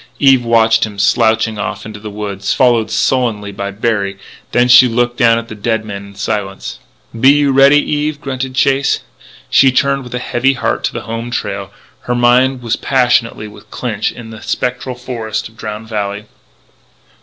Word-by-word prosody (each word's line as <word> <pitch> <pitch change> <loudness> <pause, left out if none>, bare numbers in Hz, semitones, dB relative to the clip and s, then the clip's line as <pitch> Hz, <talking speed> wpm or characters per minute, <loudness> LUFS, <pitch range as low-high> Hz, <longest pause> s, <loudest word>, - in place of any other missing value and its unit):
Eve 135 -3 +4
watched 115 -1 +3
him 105 -2 -4
slouching 110 +2 +2
off - - -4
into 110 -1 -8
the 105 +1 -7
woods, 100 -1 -3
followed 120 -4 +3
sullenly 110 -3 0
by 100 0 -5
Berry. 100 -1 -2 0.3
Then 120 0 +3
she 125 +1 +8
looked 120 +1 0
down 115 -1 +4
at 115 0 -5
the 110 - -8
dead 110 +1 -2
man 100 -1 -7
in 100 - -15
silence. 100 -1 -4 0.4
"Be 130 +3 +6
you 145 0 +4
ready, 135 +2 +6
Eve?" 150 0 -2
grunted 130 -2 -4
Chase. 135 +2 +2 0.5
She 135 -1 +5
turned 135 +1 +1
with 125 0 -7
a - - 0
heavy 125 +2 0
heart 125 - -2
to - - -2
the 120 - -4
home 115 +2 -5
trail; 100 -4 -3
but 95 - -27
her 125 - 0
mind 125 +1 +3
was 115 -1 -1
passionately 120 -4 +1
with 105 - -15
Clinch 110 -4 -3
in 115 -2 -10
the 110 0 -10
spectral 125 +2 -3
forests 115 -3 -4
of 110 - -23
Drowned 110 0 -7
Valley. 105 -1 -3
115 Hz, 180 wpm, -15 LUFS, 105-125 Hz, 0.5 s, she